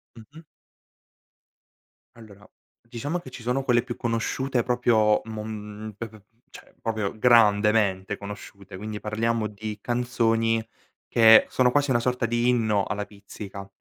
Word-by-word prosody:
Mh-mh. 130 Hz, +8 st, -14 dB, 1.7 s
Allora, 105 Hz, -3 st, -15 dB, 0.3 s
diciamo 120 Hz, +8 st, -4 dB
che 135 Hz, -7 st, -10 dB
ci 125 Hz, -, -10 dB
sono 125 Hz, +3 st, -1 dB
quelle 120 Hz, -3 st, +3 dB
più 120 Hz, -1 st, -6 dB
conosciute 120 Hz, +2 st, -1 dB
proprio 115 Hz, -3 st, +2 dB
mom 110 Hz, -1 st, -7 dB
p 115 Hz, -, -5 dB
p 110 Hz, -1 st, -16 dB, 0.3 s
cioè -, -, -15 dB
proprio 110 Hz, -2 st, -3 dB
grandemente 105 Hz, -4 st, +3 dB
conosciute, 100 Hz, -1 st, -10 dB
quindi 105 Hz, +1 st, -6 dB
parliamo 110 Hz, +1 st, -1 dB
di 105 Hz, +1 st, -7 dB
canzoni 115 Hz, -2 st, 0 dB, 0.4 s
che 110 Hz, -1 st, +7 dB
sono 125 Hz, -1 st, +2 dB
quasi 145 Hz, 0 st, +1 dB
una 120 Hz, -2 st, +3 dB
sorta 125 Hz, 0 st, -1 dB
di 120 Hz, +1 st, +1 dB
inno 110 Hz, -5 st, +2 dB
alla 105 Hz, 0 st, -3 dB
Pizzica. 100 Hz, -1 st, -10 dB
115 Hz, 130 wpm, -25 LUFS, 105-120 Hz, 1.7 s, che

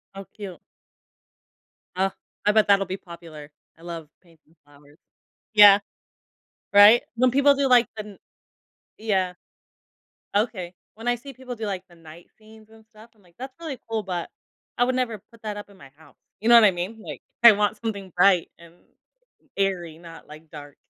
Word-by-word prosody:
How 195 Hz, -, -7 dB
cute. 195 Hz, -6 st, -9 dB, 1.4 s
Oh, 190 Hz, +1 st, 0 dB, 0.3 s
I 210 Hz, -, +4 dB
bet 215 Hz, 0 st, +3 dB
that'll 200 Hz, -1 st, +4 dB
be 185 Hz, +2 st, -5 dB
popular. 165 Hz, -5 st, -12 dB, 0.3 s
I 165 Hz, -, -21 dB
love 165 Hz, -3 st, -8 dB
painting 165 Hz, -2 st, -27 dB
flowers. 145 Hz, +1 st, -22 dB, 0.6 s
Yeah, 205 Hz, -1 st, +9 dB, 0.9 s
right? 205 Hz, +4 st, +7 dB
When 255 Hz, +2 st, +3 dB
people 280 Hz, +2 st, +4 dB
do, 275 Hz, -1 st, 0 dB
like, 245 Hz, -1 st, +5 dB
the 210 Hz, -2 st, -9 dB, 0.8 s
Yeah. 190 Hz, -4 st, -1 dB, 1.0 s
Okay. 190 Hz, -5 st, -1 dB, 0.2 s
When 225 Hz, +2 st, -9 dB
I 245 Hz, -, +2 dB
see 270 Hz, +3 st, -11 dB
people 255 Hz, 0 st, -9 dB
do, 220 Hz, -1 st, -6 dB
like, 190 Hz, -3 st, -4 dB
the 175 Hz, -, -19 dB
night 165 Hz, +1 st, -15 dB
scenes 220 Hz, 0 st, -18 dB
and 220 Hz, 0 st, -19 dB
stuff, 225 Hz, +1 st, -18 dB
I'm 210 Hz, -, -28 dB
like, 170 Hz, -1 st, -26 dB
"That's 260 Hz, +1 st, -9 dB
really 310 Hz, -6 st, -7 dB
cool, 220 Hz, -1 st, -2 dB
but, 180 Hz, -3 st, -5 dB, 0.5 s
I 245 Hz, -, +3 dB
would 255 Hz, +1 st, 0 dB
never 245 Hz, -4 st, -2 dB
put 230 Hz, -, -20 dB
that 210 Hz, -2 st, -5 dB
up 205 Hz, -, -9 dB
in 200 Hz, -, -19 dB
my 140 Hz, -7 st, -15 dB
house," 160 Hz, -2 st, -20 dB, 0.2 s
you 225 Hz, +3 st, -1 dB
know 240 Hz, -, +8 dB
what 230 Hz, -, +8 dB
I 200 Hz, -, +5 dB
mean? 185 Hz, +6 st, -6 dB
Like, -, -, -9 dB, 0.2 s
I 235 Hz, -, +10 dB
want 210 Hz, +1 st, 0 dB
something 200 Hz, -5 st, -6 dB
bright 180 Hz, -1 st, +3 dB
and 170 Hz, 0 st, -17 dB, 0.8 s
airy, 180 Hz, -5 st, -2 dB
not, 165 Hz, -1 st, -13 dB
like, 155 Hz, +1 st, -14 dB
dark. 145 Hz, -2 st, -11 dB
200 Hz, 180 wpm, -24 LUFS, 175-225 Hz, 1.4 s, I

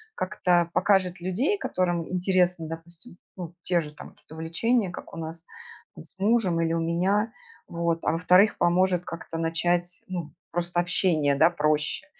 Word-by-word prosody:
как-то 180 Hz, -3 st, +1 dB
покажет 185 Hz, -3 st, +2 dB
людей, 250 Hz, -, 0 dB
которым 175 Hz, -, -1 dB
интересно, 180 Hz, -2 st, +1 dB
допустим, 170 Hz, +5 st, -10 dB, 0.2 s
ну, 175 Hz, -2 st, -7 dB
те 175 Hz, -1 st, +1 dB
же 150 Hz, -1 st, -9 dB
там -, -, -11 dB
какие-то -, -, -18 dB
увлечения, 185 Hz, +7 st, 0 dB
как -, -, -10 dB
у -, -, -8 dB
нас 165 Hz, +1 st, -5 dB, 0.5 s
там -, -, -10 dB
с -, -, -9 dB
мужем 195 Hz, -5 st, +2 dB
или 165 Hz, 0 st, 0 dB
у 165 Hz, -, 0 dB
меня, 185 Hz, +7 st, 0 dB, 0.4 s
вот. 170 Hz, -1 st, -2 dB
А -, -, +3 dB
во-вторых, 180 Hz, +5 st, +4 dB
поможет 180 Hz, 0 st, +2 dB
как-то 165 Hz, 0 st, -7 dB
начать, 175 Hz, +2 st, 0 dB
ну, 175 Hz, -4 st, -5 dB, 0.2 s
просто 175 Hz, 0 st, -1 dB
общение, 170 Hz, -5 st, +2 dB
да, 160 Hz, +4 st, +5 dB
проще, 155 Hz, -, 0 dB
175 Hz, 160 wpm, -26 LUFS, 165-185 Hz, 0.5 s, да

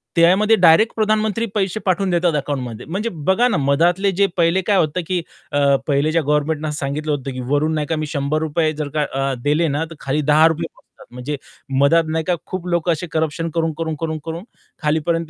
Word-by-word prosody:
त्यामध्ये 190 Hz, +6 st, +5 dB
डायरेक्ट 180 Hz, +5 st, +5 dB
प्रधानमंत्री 215 Hz, +1 st, +1 dB
पैसे 195 Hz, 0 st, 0 dB
पाठवून 190 Hz, 0 st, +1 dB
देतात 175 Hz, -1 st, +2 dB
अकाउंटमध्ये. 130 Hz, -6 st, -3 dB
म्हणजे 200 Hz, +8 st, -3 dB, 0.2 s
बघा 235 Hz, +6 st, +4 dB
ना 250 Hz, -, 0 dB
मधातले 170 Hz, +8 st, +2 dB
जे 200 Hz, -, +5 dB
पहिले 170 Hz, +2 st, +3 dB
काय 200 Hz, -, +4 dB
होतं 160 Hz, +1 st, +1 dB
की 185 Hz, -2 st, 0 dB, 0.3 s
अ, 140 Hz, -1 st, +3 dB
पहिले 145 Hz, +1 st, +2 dB
ज्या 165 Hz, +1 st, +2 dB
गव्हर्नमेंटने 150 Hz, +1 st, 0 dB
असं 150 Hz, -, -4 dB
सांगितलं 150 Hz, +1 st, -2 dB
होतं, 140 Hz, -2 st, -3 dB
की 130 Hz, -, -6 dB
वरून 150 Hz, +2 st, +2 dB
नाही 150 Hz, -1 st, -2 dB
का 160 Hz, -, 0 dB
मी 155 Hz, 0 st, -2 dB
₹100 155 Hz, +2 st, 0 dB
जर 150 Hz, -1 st, -4 dB
का 150 Hz, -, +3 dB
अ, 135 Hz, 0 st, 0 dB
दिले 150 Hz, +3 st, +2 dB
ना 150 Hz, +2 st, -1 dB
तर -, -, -8 dB
खाली 140 Hz, +3 st, -1 dB
₹10 160 Hz, +2 st, +4 dB
पोहोचतात. -, -, -24 dB, 0.3 s
म्हणजे 125 Hz, +4 st, -4 dB, 0.4 s
मध्ये 165 Hz, +4 st, +4 dB
नाही 160 Hz, 0 st, -1 dB
का 180 Hz, -, +1 dB
खूप 185 Hz, -2 st, -5 dB
लोकं 175 Hz, -1 st, +1 dB
असे 165 Hz, +2 st, -2 dB
करप्शन 160 Hz, +1 st, -1 dB
करून-करून, 160 Hz, -1 st, -1 dB
करून-करून 160 Hz, +1 st, -4 dB, 0.4 s
खालीपर्यंत 160 Hz, +2 st, 0 dB
160 Hz, 190 wpm, -20 LUFS, 150-175 Hz, 0.4 s, त्यामध्ये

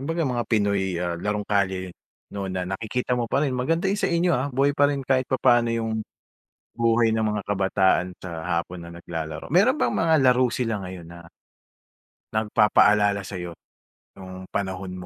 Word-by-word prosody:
kumbaga 165 Hz, +4 st, -2 dB
mga 120 Hz, -3 st, -1 dB
Pinoy, 100 Hz, -4 st, +1 dB
ah, 85 Hz, 0 st, -2 dB
larong 105 Hz, +3 st, -2 dB
kalye 95 Hz, -3 st, -1 dB, 0.4 s
'no 100 Hz, -1 st, -4 dB
na 95 Hz, -1 st, -3 dB
nakikita 110 Hz, +7 st, -3 dB
mo 120 Hz, -2 st, 0 dB
pa 140 Hz, +5 st, +1 dB
rin 135 Hz, -, -1 dB
maganda 160 Hz, +8 st, 0 dB
'yung 200 Hz, +2 st, 0 dB
sa -, -, +1 dB
inyo, 170 Hz, +1 st, +2 dB
ah, 130 Hz, +1 st, 0 dB
buhay 140 Hz, +2 st, +1 dB
pa 145 Hz, 0 st, +3 dB
rin 140 Hz, -2 st, -3 dB
kahit 130 Hz, -1 st, +1 dB
papaano 120 Hz, -3 st, +3 dB
'yung, 115 Hz, -1 st, -1 dB, 0.7 s
buhay 115 Hz, -1 st, +2 dB
ng 110 Hz, -, 0 dB, 0.2 s
mga 105 Hz, -, -3 dB
kabataan 95 Hz, -2 st, +1 dB
sa 85 Hz, -3 st, -7 dB
hapon 85 Hz, +1 st, -2 dB
na 85 Hz, -, -9 dB
naglalaro. 80 Hz, -, -6 dB
Meron 210 Hz, -, +4 dB
bang -, -, 0 dB
mga 165 Hz, -1 st, +2 dB
laro 125 Hz, 0 st, +4 dB
sila 115 Hz, -4 st, -2 dB
ngayon 90 Hz, -2 st, -8 dB
na 85 Hz, +1 st, -12 dB, 1.1 s
nagpapaalala 105 Hz, -1 st, +3 dB
sa'yo, 90 Hz, -3 st, -6 dB, 0.6 s
nung 95 Hz, -1 st, -10 dB
panahon 95 Hz, -1 st, -3 dB
105 Hz, 165 wpm, -24 LUFS, 95-130 Hz, 1.1 s, Meron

